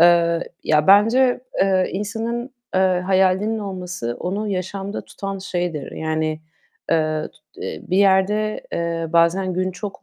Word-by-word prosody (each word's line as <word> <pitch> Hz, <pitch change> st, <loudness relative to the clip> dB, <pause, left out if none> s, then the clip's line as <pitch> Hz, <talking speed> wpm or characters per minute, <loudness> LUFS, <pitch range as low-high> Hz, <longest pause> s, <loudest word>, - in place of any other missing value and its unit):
Eee, 170 Hz, -1 st, +4 dB, 0.2 s
ya, 150 Hz, -1 st, +3 dB
bence, 230 Hz, +6 st, +5 dB, 0.2 s
eee, 190 Hz, -1 st, +2 dB
insanın, 230 Hz, +5 st, -3 dB, 0.2 s
eee, 190 Hz, -, +3 dB
hayalinin 190 Hz, +3 st, +2 dB
olması 180 Hz, -, -4 dB
onu 200 Hz, +4 st, -2 dB
yaşamda 195 Hz, +1 st, -4 dB
tutan 195 Hz, 0 st, -6 dB
şeydir. 175 Hz, -6 st, -3 dB
Yani, 155 Hz, 0 st, -2 dB, 0.5 s
eee, 155 Hz, -1 st, +1 dB
tut -, -, -27 dB
eee, 80 Hz, -, -5 dB
bir 185 Hz, -, -1 dB
yerde, 200 Hz, +2 st, +2 dB
eee, 170 Hz, -1 st, -1 dB
bazen 170 Hz, +3 st, +3 dB
gün 185 Hz, +1 st, 0 dB
çok 195 Hz, +2 st, -7 dB
185 Hz, 130 wpm, -21 LUFS, 170-200 Hz, 0.5 s, bence